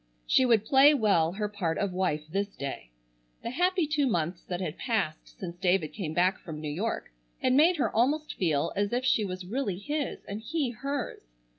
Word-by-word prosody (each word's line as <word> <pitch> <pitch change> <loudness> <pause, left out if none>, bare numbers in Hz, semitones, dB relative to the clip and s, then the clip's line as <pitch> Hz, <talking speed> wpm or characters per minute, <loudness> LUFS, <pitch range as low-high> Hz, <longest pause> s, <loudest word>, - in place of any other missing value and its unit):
She 255 - +4
would 225 -3 +4
play 275 +5 +6
well 185 - +3
her 210 +2 -2
part 185 -6 -2
of 200 -2 -1
wife 180 -5 0
this 200 +4 -2
day. 135 - -6 0.5
The 235 - -3
happy 360 +4 +2
two 295 -2 +1
months 170 -5 -1
that 180 -1 -3
had 180 -3 -4
passed 200 -11 -2
since 175 -2 -6
David 180 -4 +1
came 160 -7 -4
back 185 +2 +2
from 155 -3 -8
New 150 -1 -4
York 200 - -3 0.3
had 255 - +2
made 325 +6 +5
her 275 - 0
almost 290 +7 +1
feel 155 -6 0
as 205 0 0
if 250 +1 0
she 230 -4 +3
was 185 -2 -5
really 210 -2 -2
his 290 +8 -3
and 205 +2 -5
he 280 +1 -1
hers. 275 +3 -4
205 Hz, 195 wpm, -28 LUFS, 175-260 Hz, 0.5 s, play